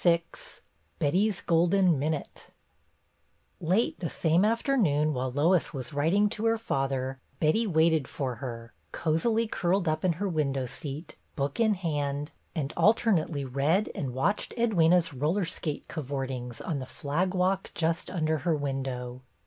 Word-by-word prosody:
VI 170 -1 +4 0.7
Betty's 190 +7 +1
golden 175 -1 +3
minute 155 +1 -3 1.2
L 165 +3 +1
ate 225 +5 +1
the 170 - -2
same 165 +3 +2
afternoon, 210 - +2
while 130 0 -1
Lois 155 +6 +2
was 130 -1 -5
writing 165 +9 +3
to 220 +2 -1
her 225 0 +3
father, 135 - -2 0.2
Betty 215 +9 +2
waited 160 -5 +3
for 130 -4 -3
her, 115 -1 -7 0.2
cosily 220 +9 +1
curled 190 -3 0
up 155 0 0
in 180 -2 +3
her 200 +5 -2
window 140 -6 0
seat, 145 +5 -6 0.2
book 140 +3 -2
in 220 -2 +4
hand, 145 -4 -2 0.2
and 150 -2 -2
alternately 180 - +2
read 145 +10 +1
and 135 -3 -3
watched 135 +12 -1
Edwyna's 180 -8 +3
roller 160 +9 0
skate 160 -2 -4
"cavortings" 130 -4 -4
on 155 -6 -2
the 130 - -6
flag 175 +9 -2
walk 185 +1 +1
just 165 0 0
under 160 -3 0
her 165 +3 +1
window. 130 -3 -4
160 Hz, 145 wpm, -28 LUFS, 140-185 Hz, 1.2 s, VI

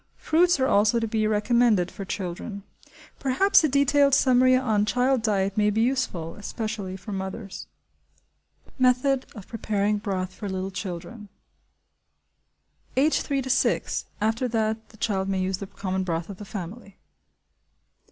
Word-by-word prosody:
Fruits 345 0 +3
are 260 - +3
also 215 0 +3
to 225 - -1
be 215 0 0
recommended 215 -3 +2
for 195 - -7
children. 190 +2 -5 0.6
Perhaps 290 +9 +4
a 310 - +3
detailed 280 0 +4
summary 255 -1 +5
on 220 -5 +2
child 250 +4 +1
diet 200 -3 0
may 210 -1 +3
be 215 +2 +1
useful, 235 -11 -1
especially 210 -3 -5
for 205 +3 -9
mothers. 190 +1 -6 1.1
Method 255 +1 +2
of 205 -4 -10
Preparing 210 -2 -1
Broth 190 -3 -3
for 205 0 -6
Little 190 0 -3
Children. 195 +3 -7 1.7
(Age 295 +4 +3
three 275 -2 -1
to 260 - -6
six; - - +1
after 225 +4 0
that 220 -1 -1
the 215 - -18
child 195 -3 -1
may 190 -1 0
use 185 0 -1
the 200 - -6
common 190 -1 -3
broth 170 -1 -3
of 195 - -10
the 205 - -9
family.) 200 +1 -8
215 Hz, 145 wpm, -25 LUFS, 195-250 Hz, 1.7 s, summary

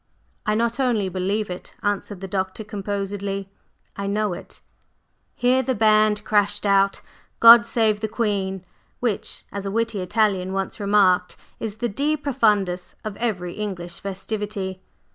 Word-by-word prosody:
"I 210 - +2
not 235 +2 0
only 230 -7 +1
believe 190 +2 -1
it," 180 - -9
answered 205 -1 -2
the 195 - -5
Doctor 190 +2 -3
composedly, 200 -1 -4 0.4
"I 200 - -4
know 210 -1 0
it!" - - -10 0.8
Here 250 +2 +3
the 260 0 -1
band 215 -1 +4
crashed 205 -1 +1
out 195 0 +3 0.4
"God 235 0 +9
save 220 -3 +2
the 220 - -1
Queen," 200 -4 -2 0.3
which, 235 -5 -2
as 200 0 -4
a - - -1
witty 230 0 -1
Italian 190 -1 +1
once 195 +2 -3
remarked, 200 -3 +3 0.2
is 220 -2 -4
the 240 +2 -1
De 290 +9 0
Profundis 210 -10 +1
of 215 -2 -5
every 180 -7 -2
English 180 -5 -5
festivity. 195 -1 -4
205 Hz, 145 wpm, -23 LUFS, 195-220 Hz, 0.8 s, God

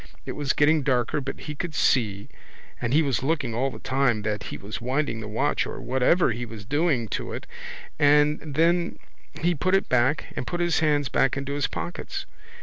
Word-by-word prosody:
It - - -4
was 145 -2 -1
getting 155 +1 +4
darker 130 +1 +1
but 135 0 -6
he 150 - -5
could 160 +1 -5
see 105 -10 +1 0.5
and 120 -1 -1
he 155 +4 +4
was 135 -5 0
looking 140 -4 0
all 130 +4 0
the - - -9
time 130 -5 +1
that 105 -1 -2
he - - -5
was 105 +4 -7
winding 130 -1 -1
the 105 - -6
watch 105 - 0
or - - -6
whatever 130 +6 +2
he 115 +3 -3
was 110 -4 -8
doing 145 -2 +1
to - - -3
it - - -6 0.5
and 150 +1 +5 0.2
then 170 +2 +2 0.4
he 175 +2 +3
put 185 +5 +1
it 195 - +1
back 130 +4 +2
and - - -4
put 175 - -2
his 175 -1 +2
hands 150 -3 +2
back 135 0 +2
into 140 +1 -3
his 145 0 0
pockets. 390 - -5
140 Hz, 200 wpm, -25 LUFS, 120-155 Hz, 0.5 s, and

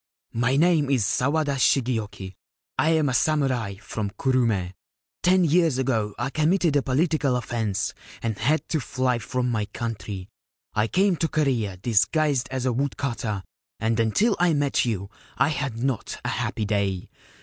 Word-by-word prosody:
My 120 +3 +1
name 155 -2 +3
is 130 -7 +2
Sawada 140 +4 +1
Shigeoki. 110 -8 0 0.5
I 160 - +3
am 160 -2 +3
a - - -1
samurai 130 -8 +1
from 105 0 -4
Kurume. 110 -7 0 0.5
Ten 185 +1 +4
years 165 -3 +3
ago 115 -6 0
I 120 +3 -2
committed 160 +1 +2
a 145 - +4
political 140 0 +1
offence 110 -5 -2 0.3
and 115 -2 -1
had 150 +8 +1
to 160 - +1
fly 125 -1 0
from 125 +1 -1
my 110 -3 0
country. 105 -3 -5 0.5
I 110 +1 +1
came 190 - +2
to 165 - +1
Korea 125 -12 0
dis 105 +1 +3
guised 145 -5 +1
as 130 -1 -3
a 125 - +2
woodcutter, 115 -6 -2 0.4
and 115 +1 0
until 195 - +2
I 175 -2 +4
met 145 -3 +1
you 100 -4 -3 0.3
I - - +3
had 140 -6 -2
not 130 -4 -2
a - - 0
happy 110 - -2
day. 100 -3 -1
125 Hz, 160 wpm, -25 LUFS, 110-145 Hz, 0.5 s, Ten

